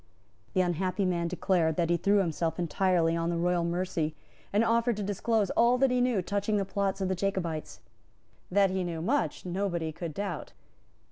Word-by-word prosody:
The 185 - +3
unhappy 185 +2 0
man 170 -2 0
declared 170 -2 +1
that 170 0 +1
he - - +4
threw 200 +3 +3
himself 165 -3 0
entirely 175 -1 +1
on 165 0 -1
the 170 - -1
royal 175 0 +1
mercy, 170 -3 -1 0.4
and 205 +3 +3
offered 230 0 +2
to 210 - -2
disclose 205 +1 0
all 240 +2 +4
that 265 0 +3
he 250 0 +2
knew 245 -7 +1
touching 205 +2 0
the 200 - 0
plots 195 0 -1
of 190 - +1
the 190 - 0
Jacobites. 180 -4 -3 0.7
That 195 0 +3
he 190 0 -1
knew 165 -2 -4
much 275 +3 0
nobody 175 -3 -2
could 165 0 -6
doubt. 195 -5 -4
185 Hz, 185 wpm, -29 LUFS, 170-200 Hz, 0.7 s, he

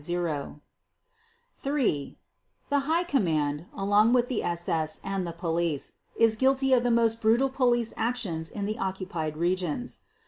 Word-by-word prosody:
_The 160 -3 -3 2.1
High 300 +5 +2
Command, 160 - 0
along 205 +4 +3
with 245 -1 +3
the 250 - -1
SS 165 -2 -1
and 195 -2 -2
the - - -3
Police, 170 -3 -2 0.2
is 225 -1 +4
guilty 265 +2 +3
of 250 - +5
the 245 - +1
most 230 -1 +2
brutal 235 +5 +3
police 240 -3 +1
actions 210 -9 -1
in 200 -2 -4
the 215 +1 -3
occupied 180 -5 -3
regions. 180 - -1
200 Hz, 130 wpm, -27 LUFS, 170-240 Hz, 2.1 s, of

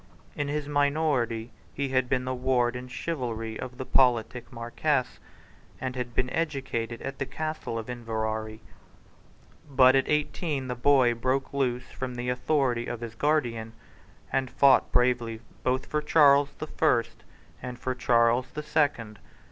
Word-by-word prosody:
In 145 - -2
his 145 0 -2
minority 140 -6 0 0.2
he 140 0 -1
had 130 -1 +1
been 125 -1 0
the 130 - -1
ward 125 -1 +1
in 125 +1 -6
chivalry 120 -5 -4
of 125 -1 -7
the 130 - -5
politic 125 -2 +2
Marquess, 125 +3 -1 0.6
and 130 0 -4
had 120 -2 -4
been 125 - 0
educated 135 -7 -2
at 135 0 -5
the 135 - -1
Castle 155 -7 -4
of 115 - -5
Inverary. 110 -2 -3 1.1
But 130 -1 +6
at 135 - +2
eighteen 150 -2 -1
the - - 0
boy 125 -1 +4
broke 130 +4 -1
loose 125 -3 0
from 130 -1 -5
the 120 +1 -3
authority 125 -2 0
of 120 - -5
his 115 -2 -6
guardian, 115 -5 0 0.6
and 135 -1 +1
fought 135 0 +4
bravely 120 -2 +1 0.2
both 130 +1 0
for 150 - -1
Charles 145 -2 +5
the 155 - -4
First 150 -6 0 0.4
and 125 -1 -6
for 130 +1 -2
Charles 120 0 +2
the 150 - -6
Second. 130 -9 0
125 Hz, 150 wpm, -27 LUFS, 120-140 Hz, 1.1 s, But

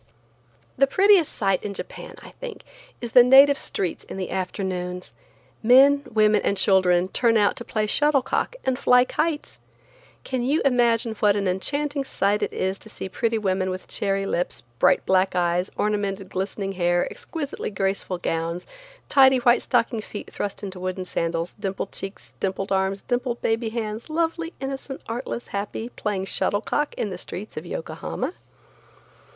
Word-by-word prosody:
The 275 - +6
prettiest 390 0 +4
sight 195 -3 0
in 200 -1 -5
Japan, - - -7
I - - -11
think, - - -9 0.4
is 240 -2 -5
the 250 - +9
native 270 +3 +7
streets 185 -4 -3
in - - -8
the 185 -2 -4
afternoons. 180 -1 -3 0.5
Men, 270 +5 +6
women 215 -2 +4
and 200 - 0
children 185 -2 +3
turn 230 +2 +3
out 205 -1 +3
to - - -5
play 215 -2 -1
shuttle 290 +4 +3
cock - - -1
and 260 -1 0
fly 250 0 +5
kites. 305 +2 -2 0.6
Can 255 -2 -2
you 280 +6 +2
imagine 235 -3 +3
what 205 -1 +4
an 200 -2 0
enchanting 285 +10 -1
sight 205 -5 0
it - - -1
is 190 +1 -2
to 220 - -11
see 190 - -6
pretty 230 +3 0
women 190 -3 0
with 185 0 -5
cherry 195 -1 -1
lips, 175 -2 -2 0.2
black - - +4
bright 190 0 +2
eyes, 175 +1 +1
ornamented, 200 -2 -1
glistening 195 +1 -3
hair, 175 -1 +1
exquisitely 300 -4 -5
graceful 195 -2 -2
gowns, 170 0 -2 0.4
tidy 265 -1 +6
white 245 0 +4
stockinged 230 -2 +1
feet 205 - -8
thrust 205 - -4
into 190 -2 -6
wooden 185 0 -3
sandals, 165 -1 -2
dimpled 195 -1 -3
cheeks, 195 +1 -8
dimpled 195 0 -2
arms, 190 0 0
dimpled 245 -1 -1
baby 225 0 0
hands, 220 +2 -4
lovely, 330 +1 -1
innocent, 270 0 -5
artless, 240 +1 -5
happy, 205 +3 -4
playing 205 -5 -3
shuttlecock 220 +9 0
in 205 - -2
the 180 - -6
streets 195 +5 -7
of 155 +3 -6
Yokohama? 170 - -4
210 Hz, 160 wpm, -24 LUFS, 190-250 Hz, 0.6 s, the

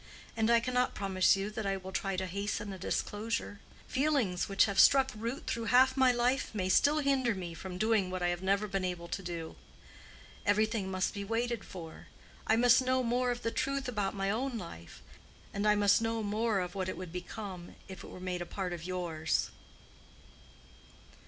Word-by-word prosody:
And 220 0 +1
I 235 0 +6
cannot 250 +1 0
promise 190 -3 +3
you 195 +2 -3
that 215 -1 -4
I 195 0 0
will 190 0 -8
try 195 0 -2
to 190 - -1
hasten 200 +2 -3
a 190 - -9
disclosure. 210 0 -2 0.3
Feelings 260 -12 +1
which 195 - +4
have 200 -2 -1
struck 270 -1 +6
root 230 +5 -4
through 230 0 -2
half 255 +3 +5
my 260 -2 +5
life 245 +2 +1
may 185 -3 -1
still 290 +10 +4
hinder 265 -5 +2
me 175 -3 -5
from 180 +2 -7
doing 215 -2 +2
what 185 -1 -3
I 175 - +2
have 175 0 -2
never 200 +2 +1
been 195 -1 -2
able 175 -2 -3
to - - -3
do. 170 -3 -6 0.9
Everything 215 -1 +1
must 185 0 -1
be 200 -2 -4
waited 230 +2 -1
for. 165 -4 -10 0.4
I 220 - +4
must 245 +2 +6
know 255 0 +1
more 245 +1 +1
of 245 0 -3
the 230 - 0
truth 275 +1 -1
about 205 -6 -2
my 195 0 0
own 250 +3 -2
life, 85 - -10 0.5
and 200 +1 0
I 210 - +5
must 205 +1 +4
know 225 0 -1
more 210 0 0
of 180 0 -4
what 185 -1 -2
it - - -5
would 180 -2 -7
become 180 0 -7
if 190 -2 -9
it - - -9
were - - -10
made 180 -1 -3
a 175 - -5
part 185 -3 -3
of 170 -2 -6
yours." 170 -3 -1
205 Hz, 195 wpm, -32 LUFS, 185-235 Hz, 0.9 s, I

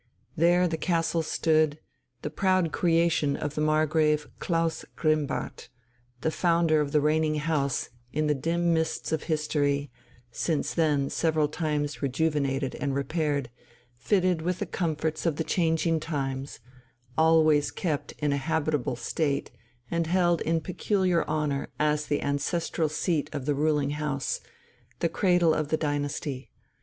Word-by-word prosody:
There 175 +2 +4
the 160 -1 -3
castle 165 -2 +1
stood, 155 -1 +2 0.5
the 150 - -3
proud 185 -1 +2
creation 165 -4 +2
of 150 -1 -3
the 150 - -2
Margrave 155 0 +2
Klaus 165 -1 0
Grimmbart, 155 -3 -1 0.5
the 160 - 0
founder 165 -2 +2
of 145 -1 -2
the 150 - +4
reigning 155 +1 +2
house 150 -3 -1 0.2
in 155 +1 0
the 150 - +3
dim 170 +4 0
mists 160 -1 -1
of 160 -1 -1
history, 145 -3 0 0.4
since 155 +5 -1
then 150 -4 +1
several 160 -2 +1
times 150 -4 -2
rejuvenated 140 -1 0
and 140 -1 -2
repaired, 140 -2 -1 0.4
fitted 180 - +1
with 180 +2 -1
the - - -2
comforts 160 -1 -2
of 160 - +1
the 160 - -1
changing 165 -1 +1
times, 135 -3 -4 0.6
always 160 -2 +4
kept 155 -6 -3
in 150 -1 -1
a - - +1
habitable 150 -3 -1
state 140 +3 -1 0.4
and 170 -1 0
held 175 -1 +2
in 165 0 +1
peculiar 185 0 +1
honour 150 -3 -1
as 150 0 +1
the 145 - 0
ancestral 155 +3 -1
seat 155 0 -1
of 140 -3 -4
the 145 - +1
ruling 145 -1 +1
house, 145 -2 -2 0.6
the 170 - 0
cradle 175 -4 +3
of 155 -1 -1
the 155 - +1
dynasty. 145 -2 -3
155 Hz, 140 wpm, -27 LUFS, 145-165 Hz, 0.6 s, There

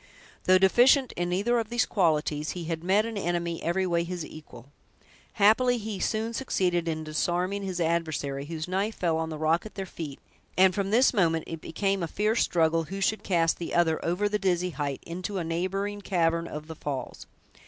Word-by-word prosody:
Though 185 0 +6
deficient 245 +8 +5
in 175 0 -2
neither 210 +7 +1
of 225 -2 -3
these 240 +1 +2
qualities, 155 -5 0
he 175 - -4
had 165 0 -4
met 200 +4 +3
an 230 -2 -4
enemy 170 -2 -2
every 180 +3 0
way 170 -2 +1
his 175 -2 -5
equal. 140 -4 -12 0.6
Happily, 235 +4 +4
he 215 -3 -5
soon 220 +3 -1
succeeded 180 -9 0
in 160 -1 -2
disarming 175 +5 -1
his 190 -2 -4
adversary, 155 -5 -1
whose 160 +1 -5
knife 195 +4 -1
fell 165 -3 0
on 160 0 -2
the 155 - -5
rock 160 +2 +1
at 215 - -11
their 195 -2 -4
feet; 155 -6 -7 0.4
and 185 0 +6
from 195 0 -1
this 245 +6 +4
moment 165 -6 +2
it 165 -1 -7
became 195 +3 -1
a 170 - -1
fierce 215 +7 +1
struggle 165 -1 +2
who 195 +5 -6
should 210 +3 +1
cast 165 -3 +1
the 170 - -4
other 165 -2 +2
over 180 +5 +1
the 210 0 -1
dizzy 180 -2 0
height 145 -4 -4
into 185 +4 -4
a 180 - -1
neighboring 195 +5 -2
cavern 170 -3 +1
of 150 0 -7
the 160 0 -8
falls. 140 -4 -5
175 Hz, 195 wpm, -27 LUFS, 165-200 Hz, 0.6 s, Though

